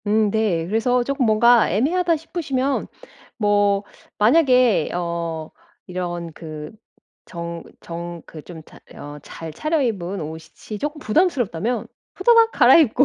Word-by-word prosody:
음 210 0 +2
네. 200 -7 0
그래서 230 +6 +1
쪼끔 275 0 -1
뭔가 235 +2 +5
애매하다 335 - +1
싶으시면 280 -4 -2 0.5
뭐 205 -2 +2 0.3
만약에 250 - +4
어 170 -2 -3 0.3
이런 175 -2 -5
그 155 -2 -8 0.5
정 170 -1 -7 0.2
정 170 0 -7
그 155 - -11
좀 160 0 -11
잘 - - -16 0.2
어 145 0 -9
잘 160 +2 -9
차려입은 220 - -1
옷이 160 +7 -8
이 - - -7
쪼끔 295 +5 -3
부담스럽다면 245 - 0 0.3
후다닥 460 -1 +5
갈아입고 265 0 +5
210 Hz, 250 characters per minute, -21 LUFS, 170-260 Hz, 0.5 s, 뭔가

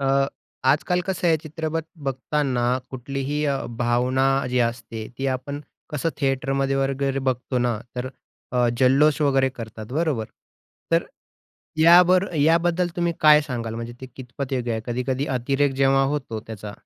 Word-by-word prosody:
अ, 135 0 +2 0.5
आजकाल 180 +5 0
कसं 185 -2 -1
आहे 160 - +4
चित्रपट 160 +1 -3 0.2
बघताना 130 -1 -1 0.3
कुठलीही 135 +3 -3
अ, 140 -1 0 0.2
भावना 125 +3 +2 0.2
जी 125 - +1
असते 115 -2 -7
ती 135 - -1
आपण 140 +3 -7 0.3
कसं 150 +2 -1
थिएटरमध्ये 135 0 0
वगैरे 135 0 0
बघतो 125 +1 -2
ना 120 -3 0 0.2
तर 125 +1 -3 0.4
अ, 125 -1 +3
जल्लोष 140 +4 +4
वगैरे 135 -2 +3
करतात, 110 -3 -8
बरोबर? 150 -7 0 0.7
तर - - +3 0.7
याबर 180 +3 +6
याबद्दल 170 +3 +3
तुम्ही 170 -1 +1
काय 150 -1 +7
सांगाल 120 -6 -4
म्हणजे 115 +1 -5
ते 130 - -7
कितपत 130 +1 -6
योग्य 120 -2 -1
आहे? 110 - -2
कधी-कधी 125 +3 -1
अतिरेक 135 +3 +1
जेव्हा 135 0 +4
होतो 120 -7 -4
त्याचा 105 -2 -7
135 Hz, 140 wpm, -23 LUFS, 125-150 Hz, 0.7 s, काय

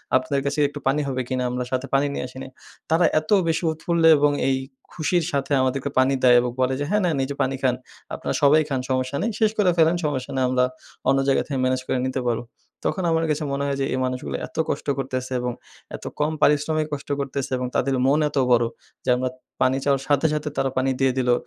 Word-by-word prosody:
"আপনাদের 135 +2 +1
কাছে 140 +2 -1
একটু 145 +1 -8
পানি 145 +3 +2
হবে 130 -1 -1
কিনা? 130 -1 -1
আমরা 125 0 -2
সাথে 130 +1 -1
পানি 140 +1 +3
নিয়ে - - -3
আসি 130 - -13
নাই," 130 - -10 0.4
তারা 165 +1 +4
এত 155 - -13 0.2
বেশি 165 +1 0
উৎফুল্ল 165 +1 -1 0.2
এবং 145 0 +3 0.2
এই 130 - +2 0.4
খুশির 170 +1 0
সাথে 140 0 -2
আমাদেরকে 135 +2 -1
পানি 130 +1 +3
দেয় 125 -1 +7
এবং 125 0 -2
বলে 130 +1 +2
যে, 145 - -1
"হ্যাঁ, 210 +1 +2
নেন 160 -5 +1
এই 130 - -2
যে - - -4
পানি 135 0 0
খান, 130 -2 +2 0.4
আপনারা - - -3
সবাই 150 +2 +6
খান 135 -2 0
সমস্যা 130 +1 -1
নেই, 230 - 0
শেষ 220 -1 +3
করে 205 -4 +4
ফেলেন, 165 +1 +4
সমস্যা 130 -4 -2
নেই, 130 - +1
আমরা 125 0 +2 0.5
অন্য 135 - +4
জায়গা 135 - +3
থেকে 135 -3 -2
ম্যানেজ 130 0 +1
করে - - 0
নিতে 130 0 -2
পারব।" 115 -1 0 0.5
তখন 190 - -2
আমার 165 0 +2
কাছে 150 0 0
মনে 140 0 -1
হয় 140 -1 -1
যে, - - +1
এই 130 - -1
মানুষগুলো 130 0 -3
এত - - -17
কষ্ট - - -3
করতেছে 130 -1 -3
এবং 125 0 -2 0.4
এত - - -10 0.2
কম 150 +1 +1
পারিশ্রমিক 155 +1 +2
কষ্ট 140 0 -6
করতেছে 140 -1 -3
এবং 125 0 -2
তাদের 135 +1 +1
মন 140 +3 +3
এত 145 - -6
বড়ো, 120 -1 +4 0.4
যে - - -1
আমরা 130 +1 -1 0.3
পানি 130 +1 +3
চাওয়ার 140 -2 +2
সাথে, 145 +1 +2
সাথে 150 0 -2
তারা 135 - +1
পানি 135 +1 +2
দিয়ে 135 -1 +3
দিলো, 125 -1 +3
135 Hz, 230 wpm, -23 LUFS, 130-150 Hz, 0.5 s, দেয়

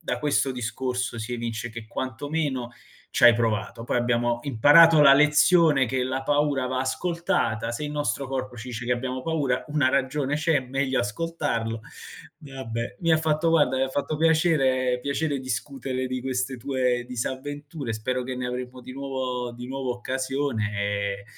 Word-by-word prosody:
da - - -3
questo 140 -2 +1
discorso 125 0 -3
si 115 +2 -5
evince 115 -1 -3
che 115 0 -8
quantomeno 130 +1 -3 0.4
c'hai 120 0 +7
provato. 115 -1 -1
Poi 120 - -1
abbiamo 120 0 +1
imparato 145 +6 +6
la 140 -2 +8
lezione 150 0 +5
che 130 +2 -1
la 130 +1 -2
paura 145 -2 +1
va 130 0 -1
ascoltata, 165 - -1
se 135 +6 -4
il 150 - -4
nostro 145 -2 -1
corpo 130 -2 -4
ci 120 +2 -8
dice 120 -1 -5
che 125 - +2
abbiamo 130 +1 -3
paura 145 -6 -1
una 145 -3 +2
ragione 140 +2 0
c'è, 160 -2 +2
meglio 130 +1 -1
ascoltarlo. 115 -2 -2 0.6
Vabbè, 130 -6 -6
mi 165 -2 +2
ha 160 - +6
fatto 160 +1 +1
guarda, 150 -5 +3
mi 130 - +1
ha 135 - +1
fatto 145 +3 -2
piacere 145 -6 +2
piacere 140 +1 -1
discutere 130 +1 -3
di 130 0 -3
queste 130 0 -2
tue 125 -1 0
disavventure, 135 +2 -5
spero 125 +4 -2
che 130 0 -4
ne 125 0 -3
avremo 125 +1 -5
di 130 - -10
nuovo 130 -3 -3
di 120 +1 -8
nuovo 135 -1 -3
occasione 130 -2 -2
e 100 -1 -2
130 Hz, 165 wpm, -25 LUFS, 120-145 Hz, 0.6 s, la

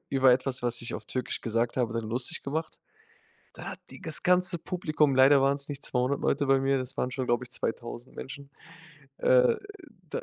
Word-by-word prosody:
über 135 -2 +5
etwas, 130 0 0
was 120 0 -1
ich 120 - -2
auf 110 - -6
Türkisch 130 +3 -3
gesagt 115 +1 -1
habe, 120 -3 0
dann 115 -1 -2
lustig 120 +3 -2
gemacht. 155 +3 -4 0.7
Da - - -10
hat - - -7
die - - -8
das 160 - 0
ganze 180 0 +4
Publikum 155 -5 0
leider 135 +1 +6
waren's 140 +1 0
nicht 145 -1 -5
200 125 +2 0
Leute 145 0 +1
bei 135 0 +4
mir, 135 0 +2
das 130 +1 -3
waren 125 - -1
schon, 130 0 -3
glaube 120 +1 +1
ich, 125 - -12
2000 120 +2 -5
Menschen, 140 +1 -8 0.7
äh, 125 -1 +4 0.5
dann - - -3
130 Hz, 195 wpm, -28 LUFS, 125-140 Hz, 0.7 s, leider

